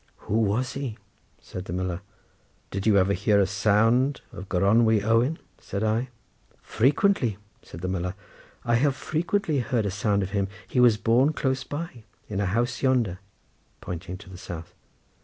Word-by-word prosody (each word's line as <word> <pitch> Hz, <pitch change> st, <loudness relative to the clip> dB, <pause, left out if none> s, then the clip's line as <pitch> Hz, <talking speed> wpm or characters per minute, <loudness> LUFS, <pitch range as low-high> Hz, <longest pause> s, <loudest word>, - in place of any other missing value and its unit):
"Who 110 Hz, -, 0 dB
was 115 Hz, +5 st, +1 dB
he?" 135 Hz, -6 st, -4 dB, 0.4 s
said 90 Hz, 0 st, -8 dB
the 85 Hz, -, -5 dB
miller. 90 Hz, -1 st, -2 dB, 0.7 s
"Did 100 Hz, +2 st, -2 dB
you 105 Hz, -2 st, +5 dB
ever 95 Hz, +1 st, +3 dB
hear 100 Hz, +2 st, +3 dB
a 100 Hz, -, +4 dB
sound 110 Hz, +7 st, +2 dB
of 95 Hz, +2 st, -9 dB
Gronwy 105 Hz, +3 st, +3 dB
Owen?" 115 Hz, +8 st, +2 dB, 0.2 s
said 100 Hz, +1 st, -4 dB
I. 110 Hz, +4 st, 0 dB, 0.5 s
"Frequently," 130 Hz, -, +2 dB, 0.2 s
said 85 Hz, -, -11 dB
the 95 Hz, -, -2 dB
miller; 90 Hz, 0 st, -2 dB, 0.5 s
"I 120 Hz, 0 st, +3 dB
have 135 Hz, +2 st, +2 dB
frequently 165 Hz, +1 st, -1 dB
heard 120 Hz, -2 st, 0 dB
a 100 Hz, -, -1 dB
sound 100 Hz, 0 st, +1 dB
of 95 Hz, -, -5 dB
him. 100 Hz, -1 st, 0 dB, 0.2 s
He 125 Hz, -, 0 dB
was 120 Hz, -3 st, +6 dB
born 125 Hz, +7 st, +3 dB
close 130 Hz, -2 st, -1 dB
by 145 Hz, -6 st, -6 dB, 0.2 s
in 100 Hz, -2 st, -3 dB
a 100 Hz, -, +1 dB
house 120 Hz, +6 st, 0 dB
yonder," 120 Hz, -9 st, +1 dB, 0.6 s
pointing 90 Hz, +1 st, -6 dB
to 100 Hz, 0 st, -14 dB
the 90 Hz, -, -10 dB
south. 85 Hz, -3 st, -8 dB
110 Hz, 165 wpm, -26 LUFS, 95-125 Hz, 0.7 s, was